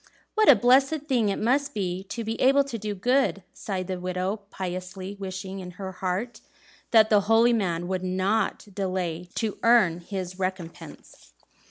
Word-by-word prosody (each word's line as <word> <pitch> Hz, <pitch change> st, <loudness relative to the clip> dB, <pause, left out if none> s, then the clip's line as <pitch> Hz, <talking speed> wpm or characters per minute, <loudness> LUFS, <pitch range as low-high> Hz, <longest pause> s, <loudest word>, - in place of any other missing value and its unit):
'" -, -, -38 dB
"What 435 Hz, 0 st, +4 dB
a 280 Hz, -, +10 dB
blessed 265 Hz, +6 st, +4 dB
thing 240 Hz, -7 st, +2 dB
it 195 Hz, -, -1 dB
must 275 Hz, +5 st, 0 dB
be 185 Hz, -2 st, -2 dB
to 230 Hz, +4 st, -5 dB
be 225 Hz, +1 st, -4 dB
able 275 Hz, +2 st, +5 dB
to 260 Hz, -5 st, -6 dB
do 210 Hz, 0 st, -4 dB
good!" 245 Hz, -1 st, +1 dB
sighed 190 Hz, -3 st, -4 dB
the 185 Hz, 0 st, -4 dB
widow, 185 Hz, +3 st, -2 dB
piously 185 Hz, +1 st, -6 dB
wishing 190 Hz, 0 st, -6 dB
in 180 Hz, -1 st, -7 dB
her 190 Hz, -1 st, -5 dB
heart 190 Hz, +5 st, -3 dB, 0.5 s
that 220 Hz, -1 st, +5 dB
the 205 Hz, -1 st, +6 dB
holy 230 Hz, +2 st, +5 dB
man 175 Hz, -6 st, -1 dB
would 185 Hz, 0 st, -2 dB
not 190 Hz, +3 st, 0 dB
delay 180 Hz, -3 st, -3 dB
to 220 Hz, -3 st, -2 dB
earn 215 Hz, -8 st, +4 dB
his 185 Hz, 0 st, -6 dB
recompense. 175 Hz, -, -7 dB
195 Hz, 170 wpm, -26 LUFS, 185-230 Hz, 0.5 s, a